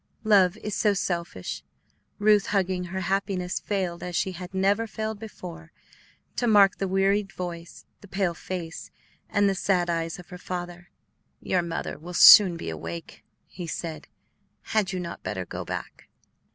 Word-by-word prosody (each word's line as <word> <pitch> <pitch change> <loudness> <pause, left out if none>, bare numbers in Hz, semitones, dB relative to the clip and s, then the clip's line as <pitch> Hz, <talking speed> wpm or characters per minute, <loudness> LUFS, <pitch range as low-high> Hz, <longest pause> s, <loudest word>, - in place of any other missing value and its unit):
Love 200 -3 +4
is 210 -1 -5
so 210 0 +2
selfish. 170 - -3 0.6
Ruth, 210 -1 +4
hugging 185 -2 0
her 190 +2 -4
happiness, 190 -1 -1
failed, 185 -4 -2
as 180 -1 -5
she 190 - 0
had 180 0 -8
never 200 +4 +1
failed 220 0 -4
before, 170 -6 -9 0.7
to 245 - +1
mark 205 -3 +5
the 195 - 0
wearied 195 +1 +1
voice, 170 -2 -7
the 205 - -14
pale 190 -2 0
face, 170 -1 -6 0.4
and 205 0 +3
the 195 - +2
sad 180 -2 +1
eyes 165 -1 -2
of 180 - -13
her 180 - -9
father. 175 -1 -6 0.5
"Your 180 - 0
mother 170 -1 -4
will 175 +2 -8
soon 185 -3 +9
be 80 - -5
awake," 80 +1 -7 0.2
he 175 -2 -8
said; 160 -1 -5 0.7
"had 215 -4 +2
you 185 - -3
not 170 -1 -6
better 95 -3 -4
go - - -6
back?" - - -7
185 Hz, 160 wpm, -26 LUFS, 170-200 Hz, 0.7 s, soon